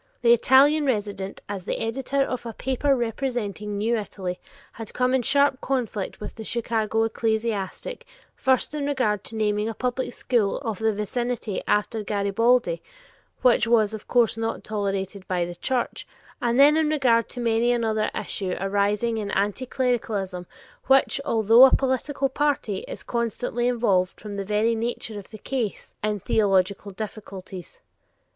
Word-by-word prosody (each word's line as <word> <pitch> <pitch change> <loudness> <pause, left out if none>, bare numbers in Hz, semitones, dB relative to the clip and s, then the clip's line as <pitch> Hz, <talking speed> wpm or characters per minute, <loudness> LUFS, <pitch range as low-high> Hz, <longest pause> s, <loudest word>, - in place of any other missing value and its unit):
The 235 0 +7
Italian 280 +5 +5
resident, 205 -5 -2
as 200 -2 -5
the - - -2
editor 270 +4 0
of 255 -3 -4
a 230 - -5
paper 265 +3 +1
representing 225 -4 -3
new 225 +3 +1
Italy, 190 -4 -4 0.3
had 225 -2 -9
come 255 0 +2
in 265 - +3
sharp 275 +1 +2
conflict 235 -7 -2
with - - -7
the 225 - -8
Chicago 225 -1 0
ecclesiastic, 220 - -2 0.3
first 260 +2 +1
in 290 -2 -2
regard 245 -8 0
to 225 - -3
naming 210 0 0
a 225 - -5
public 250 0 -2
school 230 -6 0
of 225 -7 -4
the 220 0 +2
vicinity 215 0 -2
after 210 +2 +1
Garibaldi, 230 - +1 0.6
which 235 -2 +4
was 220 -2 +3
of 215 - -8
course 235 -3 +3
not 225 0 -3
tolerated 200 -2 -3
by 180 -2 0
the 175 - -6
Church, 245 +8 -2 0.3
and 240 +1 +1
then 295 +2 +7
in 315 -1 +2
regard 250 -7 +2
to 250 - -6
many 235 0 +2
another 220 -3 +1
issue 190 -2 -3
arising 205 +4 0
in 205 -2 -4
anticlericalism, 210 -5 -1 0.4
which, 270 +1 +4
although 230 0 +6
a 265 - +5
political 275 +1 0
party, 270 -7 0
is - - -7
constantly 240 +1 -1
involved, 200 -7 +1
from 210 -1 -7
the 200 -1 -3
very 210 +3 +2
nature 225 -2 -3
of 200 - -13
the 215 - -10
case, 235 -2 -4
in 210 -1 0
theological 195 0 +1
difficulties. 195 -3 -8
225 Hz, 150 wpm, -25 LUFS, 205-250 Hz, 0.6 s, The